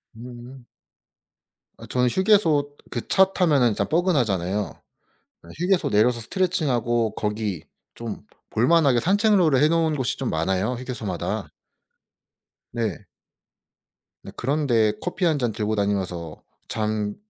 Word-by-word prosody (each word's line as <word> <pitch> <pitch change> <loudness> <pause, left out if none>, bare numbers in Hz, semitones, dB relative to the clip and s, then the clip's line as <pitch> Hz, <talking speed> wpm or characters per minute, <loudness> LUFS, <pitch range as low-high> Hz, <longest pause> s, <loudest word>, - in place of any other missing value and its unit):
음. 120 +2 -11 1.1
아 - - -11
저는 125 -1 +2
휴게소, 165 - +2
그 120 - -5
차 190 0 +4
타면은 145 -10 +3
진짜 100 -2 -1
뻐근하잖아요. 110 - 0 0.7
예 - - -15
휴게소 180 +2 +1
내려서 115 +3 +3
스트레칭 180 - -1
하고 120 -2 0
거기 105 -5 -3 0.3
좀 115 -3 -7 0.3
볼 115 +3 +2
만하게 150 -7 +4
산책로를 190 - +3
해 150 - +5
놓은 165 -1 +1
곳이 130 -5 -2
좀 - - -2
많아요 95 +8 0
휴게소마다. 120 -7 -4 1.2
네. 110 -7 -3 1.2
네 - - -9
그런 145 +4 -1
데 110 -4 +3
커피 180 +1 -2
1 160 -4 +2
잔 120 -3 0
들고 110 0 -2
다니면서 95 -6 -2 0.3
잠 105 -1 -2
120 Hz, 255 characters per minute, -24 LUFS, 105-155 Hz, 1.2 s, 해